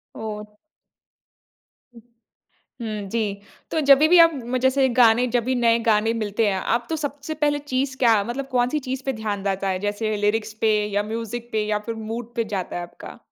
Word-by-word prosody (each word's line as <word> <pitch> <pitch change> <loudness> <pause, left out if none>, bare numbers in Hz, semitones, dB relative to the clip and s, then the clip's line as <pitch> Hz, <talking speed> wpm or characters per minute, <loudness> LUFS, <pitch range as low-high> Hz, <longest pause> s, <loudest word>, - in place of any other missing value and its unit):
ओह! 210 -1 -7 1.4
उ - - -12 0.8
हुँ, 215 -3 -4
जी। 230 - 0 0.5
तो 320 - 0
जभी 285 +3 +7
भी 355 +1 +6
आप 330 0 +8
म 255 -1 -3
जैसे 265 0 +3
गाने 240 +1 +5
जब 235 - 0
भी 260 - 0
नए 235 -2 +3
गाने 220 +1 +3
मिलते 210 +1 0
हैं, 190 -1 -1
आप 235 +1 -1
तो 320 - 0
सबसे 290 +2 -4
पहले 290 0 +2
चीज़ 265 -2 -2
क्या 225 -5 +4
मतलब 270 +3 -4
कौन-सी 245 +5 +2
चीज़ 260 0 -3
पे 270 - +1
ध्यान 205 -2 -2
जाता 195 0 -1
है, 185 -1 0
जैसे 210 +1 -1
लीरिक्स 215 0 0
पे 220 -1 +3 0.2
या 205 - +2
मूज़िक 230 +1 -5
पे 215 -1 0
या 210 0 0
फिर 230 - -3 0.2
मूड 235 0 -6
पे 230 -2 0
जाता 185 -2 -3
है 175 - -3
आपका? 175 - -11
230 Hz, 195 wpm, -23 LUFS, 210-260 Hz, 1.4 s, आप